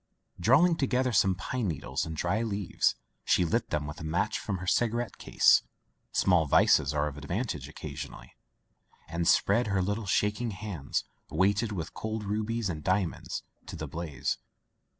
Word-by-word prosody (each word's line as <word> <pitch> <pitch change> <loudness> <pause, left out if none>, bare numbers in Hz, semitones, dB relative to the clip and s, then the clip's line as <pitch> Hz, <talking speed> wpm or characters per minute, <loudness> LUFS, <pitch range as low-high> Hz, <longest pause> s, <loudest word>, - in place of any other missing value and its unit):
Drawing 145 - +5
together 130 -2 +1
some 95 -2 +4
pine 110 +5 -2
needles 70 -4 -2
and 80 -1 -5
dry 95 +8 0
leaves 100 -4 0 0.3
she 90 - +3
lit 80 - 0
them 75 -1 -1
with 75 +2 -7
a - - -6
match 80 +3 0
from 100 - -3
her 95 - -7
cigarette 120 +4 0
case - - +5 0.5
(small 90 -5 +3
vices - - +5
are 75 -1 0
of 75 0 -6
advantage 85 - -3
occasionally) - - -8 0.7
and 85 +1 -2
spread 105 +6 +4
her 100 -2 +1
little 105 +2 -2
shaking 105 +5 +1
hands, 95 -8 -3 0.3
weighted 100 +6 +2
with 85 -6 -4
cold 110 0 -4
rubies 110 +2 -1
and 80 -4 -4
di 95 +2 +3
amonds, 85 - -5 0.2
to - - -6
the 75 -1 -5
blaze. 75 -2 -3
95 Hz, 160 wpm, -29 LUFS, 80-110 Hz, 0.7 s, Drawing